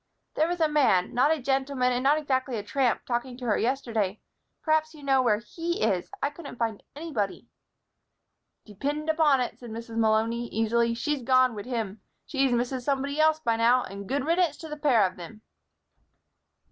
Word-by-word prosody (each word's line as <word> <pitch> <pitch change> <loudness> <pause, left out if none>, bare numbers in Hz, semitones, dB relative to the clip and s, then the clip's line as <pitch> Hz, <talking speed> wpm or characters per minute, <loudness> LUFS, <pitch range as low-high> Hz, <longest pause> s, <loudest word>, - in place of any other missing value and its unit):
"There 315 - +2
was 350 0 -2
a 320 - +4
man 270 -12 +2
not 255 +4 +3
a 320 -1 +2
gentleman 265 -1 0
and 245 - 0
not 285 +3 +4
exactly 260 -4 -1
a 205 - -4
tramp 250 +2 0
talking 245 +1 -3
to 250 - -7
her 215 -3 +2
yesterday. 225 -6 -1 0.4
Perhaps 315 0 +1
you 295 - -13
know 270 -1 +3
where 225 -4 +3
he 330 +9 -4
is. 190 -5 0
I 285 - +1
couldn't 290 -3 -10
find 225 -3 -2
anybody." 285 -11 -3 1.2
"Depind 290 +9 -2
upon 305 -4 +3
it," 245 - -4
said 240 - -10
Mrs. 230 +1 -7
Malony, 225 +2 +1
easily, 230 +1 +1
"she's 295 +3 -2
gone 255 0 +4
wid 205 +1 -7
him. 220 -5 -3 0.2
She's 270 -2 +1
Mrs. 245 +2 0
Somebody 280 +2 -1
Else 315 0 +4
by 230 -5 +1
now, 240 +2 +4
and 200 0 -8
good 280 0 -1
riddance 340 +1 +1
to 320 - -9
the 300 - -4
pair 280 -8 +3
av 185 -1 -1
thim." 215 +5 -11
255 Hz, 185 wpm, -27 LUFS, 225-290 Hz, 1.2 s, a